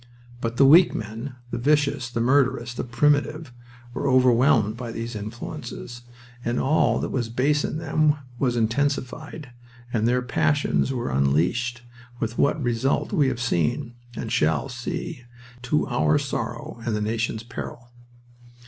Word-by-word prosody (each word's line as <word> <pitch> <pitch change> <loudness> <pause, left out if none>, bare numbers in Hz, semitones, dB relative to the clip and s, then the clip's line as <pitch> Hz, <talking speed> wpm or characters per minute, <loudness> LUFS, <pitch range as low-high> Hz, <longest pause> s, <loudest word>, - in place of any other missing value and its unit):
But 115 0 -3
the 140 - +6
weak 170 +6 +7
men, 115 +5 -5 0.2
the 120 - -2
vicious, 140 -1 +1
the 115 -1 -2
murderous, 125 -1 +2
the - - -3
primitive, 145 +3 +1 0.4
were 140 - -1
overwhelmed 125 -4 +4
by 120 -1 -6
these 115 0 -5
influences, 120 +3 -7 0.4
and 120 +1 -1
all 155 +4 +3
that - - -3
was 120 -4 -1
base 140 +5 +1
in - - -2
them 155 -2 +2 0.2
was 125 -3 +1
intensified, 140 +4 -2 0.4
and 115 -1 +2
their 125 +1 +2
passions 145 +3 +1
were 120 - -2
unleashed, 85 - +1 0.4
with 115 +1 -3
what 145 - +3
result 120 +3 0
we 145 -3 +3
have 125 -2 -1
seen, 120 0 0 0.2
and 110 - -5
shall 80 - +1
see, 145 +4 -5 0.4
to 140 +5 +1
our 75 0 +2
sorrow 115 - -4
and 115 -2 -1
the 105 - -1
nation's 110 +1 -1
peril. 120 0 -8
120 Hz, 145 wpm, -24 LUFS, 115-140 Hz, 0.4 s, weak